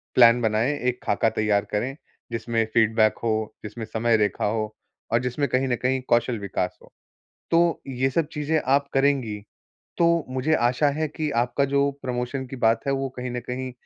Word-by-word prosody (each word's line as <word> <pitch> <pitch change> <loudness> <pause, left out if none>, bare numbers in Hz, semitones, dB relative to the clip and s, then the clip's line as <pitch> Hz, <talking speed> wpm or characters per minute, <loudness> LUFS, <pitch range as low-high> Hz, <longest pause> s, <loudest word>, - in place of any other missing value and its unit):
Plan 120 -1 +7
बनाएँ, 110 +5 +1
एक 125 0 -1
खाका 110 +2 +2
तैयार 105 -2 +1
करें, 125 +6 -1 0.4
जिसमें 115 0 0
फीडबैक 110 -1 +3
हो, 110 -1 -1
जिसमें 110 +2 -6
समय 115 +1 +1
रेखा 105 -1 0
हो 110 0 -2 0.4
और 115 - +4
जिसमें 125 +3 -1
कहीं 130 +1 +1
न 120 - +2
कहीं 130 +1 +1
कौशल 120 -1 +2
विकास 95 -2 -3
हो। - - -19 0.6
तो 170 0 +3
ये 130 0 0
सब 165 +2 +1
चीज़ें 150 +1 0
आप 140 +1 +3
करेंगी, 135 -6 +1 0.6
तो 170 -2 +3
मुझे 130 +4 0
आशा 125 +4 +2
है 155 - +1
कि 155 0 -3
आपका 140 +3 0
जो 140 0 +3
प्रमोशन 125 +1 -3
की 135 - -7
बात 115 -1 +3
है 140 - +2
वो 135 0 -1
कहीं 125 0 -4
न 125 - -3
कहीं, 130 0 -3
125 Hz, 180 wpm, -24 LUFS, 110-135 Hz, 0.6 s, Plan